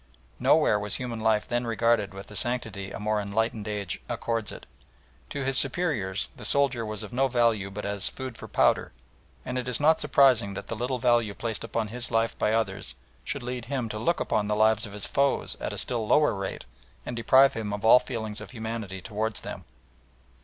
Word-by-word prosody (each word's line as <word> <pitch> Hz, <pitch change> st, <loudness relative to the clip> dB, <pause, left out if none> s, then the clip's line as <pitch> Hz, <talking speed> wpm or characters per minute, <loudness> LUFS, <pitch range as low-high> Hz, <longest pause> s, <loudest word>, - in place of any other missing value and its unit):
Nowhere 105 Hz, -, +4 dB
was 105 Hz, 0 st, -2 dB
human 120 Hz, -3 st, -4 dB
life 110 Hz, -1 st, +2 dB
then 120 Hz, 0 st, -1 dB
regarded 115 Hz, -2 st, +2 dB
with 95 Hz, +1 st, -9 dB
the 105 Hz, -, -12 dB
sanctity 110 Hz, -5 st, -2 dB
a -, -, -7 dB
more 105 Hz, 0 st, 0 dB
enlightened 110 Hz, +1 st, -1 dB
age 105 Hz, -3 st, -3 dB
accords 115 Hz, -3 st, -2 dB
it. -, -, -10 dB, 0.6 s
To 140 Hz, -, -3 dB
his 135 Hz, -1 st, +4 dB
superiors 130 Hz, -, 0 dB
the -, -, -11 dB
soldier 140 Hz, -4 st, +2 dB
was 105 Hz, -2 st, -5 dB
of -, -, -9 dB
no 135 Hz, +2 st, +2 dB
value 115 Hz, -5 st, +2 dB
but 105 Hz, +2 st, -6 dB
as 100 Hz, -1 st, +1 dB
"food 130 Hz, -3 st, -7 dB
for -, -, -9 dB
powder," -, -, +2 dB, 0.5 s
and 125 Hz, 0 st, -2 dB
it 125 Hz, -, -5 dB
is 125 Hz, -2 st, +2 dB
not 155 Hz, +2 st, +4 dB
surprising 120 Hz, -8 st, +4 dB
that 100 Hz, -, -7 dB
the 115 Hz, -, -2 dB
little 125 Hz, +3 st, -2 dB
value 120 Hz, -4 st, +2 dB
placed 115 Hz, 0 st, -4 dB
upon 115 Hz, -1 st, -2 dB
his 125 Hz, +2 st, -3 dB
life 115 Hz, 0 st, +1 dB
by 105 Hz, -, +2 dB
others 100 Hz, -, -1 dB, 0.3 s
should 140 Hz, -, -3 dB
lead 125 Hz, -1 st, -4 dB
him 125 Hz, -3 st, -2 dB
to 110 Hz, -, -4 dB
look 170 Hz, +10 st, +1 dB
upon 105 Hz, -1 st, 0 dB
the 105 Hz, -, 0 dB
lives 110 Hz, +1 st, +3 dB
of 100 Hz, -, -11 dB
his 105 Hz, -1 st, +1 dB
foes 140 Hz, 0 st, +1 dB
at -, -, -2 dB
a -, -, -6 dB
still 115 Hz, -3 st, -1 dB
lower 150 Hz, -1 st, +4 dB
rate 95 Hz, -1 st, -5 dB, 0.4 s
and 125 Hz, -, -4 dB
deprive 130 Hz, +4 st, +5 dB
him 110 Hz, -2 st, -4 dB
of 105 Hz, +1 st, -4 dB
all 120 Hz, +3 st, +8 dB
feelings 110 Hz, -5 st, -5 dB
of -, -, -9 dB
humanity 110 Hz, -5 st, -5 dB
towards 110 Hz, +1 st, -2 dB
them. -, -, -7 dB
115 Hz, 205 wpm, -27 LUFS, 105-125 Hz, 0.6 s, all